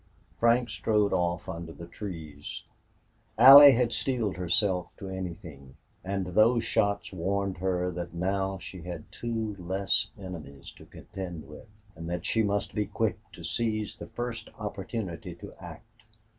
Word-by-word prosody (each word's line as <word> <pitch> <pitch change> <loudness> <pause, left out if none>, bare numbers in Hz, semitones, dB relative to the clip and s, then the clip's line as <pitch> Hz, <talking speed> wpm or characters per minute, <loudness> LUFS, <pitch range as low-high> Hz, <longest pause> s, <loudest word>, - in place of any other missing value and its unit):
Frank 120 0 +3
strode 105 +2 +1
off 85 +1 0
under 85 -2 -6
the 80 +2 -9
trees. 80 -6 -7 0.7
Allie 135 +4 +11
had 120 0 +1
steeled 120 -8 -1
herself 90 0 +1
to 95 - -7
anything, 85 -8 -7 0.3
and 95 0 -2
those 110 +6 +3
shots 100 -2 0
warned 95 +1 -1
her 90 -1 0
that 85 0 -5
now 95 +2 -1
she 95 -1 -9
had 85 -2 -8
two 110 -3 -3
less 95 +4 +1
enemies 80 -8 -9
to - - -16
contend 90 -5 -8
with, 105 +7 -14
and 80 0 -7
that 90 0 -3
she 115 - +2
must 100 -1 -1
be 105 -2 -1
quick 110 +1 -1
to - - -11
seize 110 -3 -1
the - - -8
first 120 -2 -5
opportunity 100 -3 -5
to - - -11
act. - - -12
95 Hz, 145 wpm, -28 LUFS, 85-110 Hz, 0.7 s, Allie